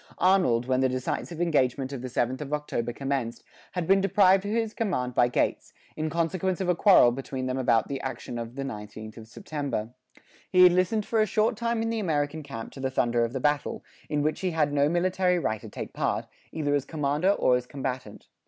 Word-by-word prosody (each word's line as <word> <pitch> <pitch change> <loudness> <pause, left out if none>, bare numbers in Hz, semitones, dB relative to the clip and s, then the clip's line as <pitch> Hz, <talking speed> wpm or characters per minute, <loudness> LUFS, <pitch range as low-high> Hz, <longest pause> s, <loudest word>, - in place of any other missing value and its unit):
Arnold, 180 -11 +3
when 130 0 +1
the 130 0 +3
decisive 130 +6 -3
engagement 135 -5 +1
of 130 - -5
the 130 - -4
7th 125 +1 -1
of 150 0 -5
October 135 -5 -2
commenced, 135 -2 -3 0.3
had 180 -2 -2
been 195 +3 +4
deprived 195 0 +4
of - - -2
his 225 -1 0
command 130 - -1
by 120 - +4
Gates, 120 - -1 0.2
in 155 0 -2
consequence 170 +3 -1
of 190 - -2
a 180 - +4
quarrel 180 - +6
between 130 +1 -5
them 130 +1 -2
about 115 -3 +2
the 140 -1 -4
action 125 -2 -5
of 115 +1 -6
the 140 - -3
19th 110 -2 -8
of 110 -1 -10
September. 135 - -4 0.6
He 185 -1 +6
had 180 - +8
listened 185 +4 +1
for 225 -1 +1
a 215 - +2
short 220 +4 +1
time 235 0 -1
in 225 - -1
the 225 - -1
American 155 -4 -1
camp 115 -6 -7
to - - -11
the 135 0 -1
thunder 120 -2 +1
of 115 - -1
the 135 - -2
battle, 145 +1 0 0.3
in 145 -1 0
which 155 +1 0
he 185 - -1
had 155 -4 0
no 145 0 +3
military 180 +1 +1
right 110 -10 -1
to - - -9
take - - -7
part, - - -1 0.3
either 145 -3 -1
as 145 -2 +1
commander 150 +4 0
or 130 -10 +3
as 125 0 -2
combatant. 130 -6 -5
145 Hz, 220 wpm, -27 LUFS, 125-180 Hz, 0.6 s, had